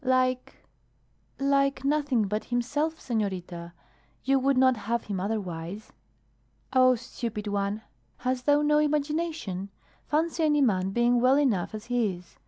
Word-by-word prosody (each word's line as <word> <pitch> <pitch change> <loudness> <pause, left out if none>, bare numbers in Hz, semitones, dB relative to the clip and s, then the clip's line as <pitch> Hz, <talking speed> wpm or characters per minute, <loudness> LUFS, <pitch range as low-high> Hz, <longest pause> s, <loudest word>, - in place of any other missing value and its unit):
"Like 255 0 +1 0.8
like 275 -1 +2
nothing 280 -7 +1
but 210 +2 -2
himself, 290 +7 -1
senorita. 180 -7 -3 0.5
You 270 0 +3
would 270 0 +2
not 260 0 +5
have 230 +2 -2
him 200 -3 -4
otherwise." 190 -1 -4 0.8
"Oh, 255 -1 +6
stupid 230 -2 -5
one! 205 +1 -2 0.3
Hast 255 +1 -2
thou 290 0 +4
no 300 0 +4
imagination? 300 - -1 0.4
Fancy 325 +2 0
any 295 -1 +3
man 190 -7 +2
being 240 +3 +2
well 260 +2 +5
enough 220 -9 0
as 215 +1 -7
he 235 -6 0
is! 175 0 -17
245 Hz, 135 wpm, -27 LUFS, 205-275 Hz, 0.8 s, Oh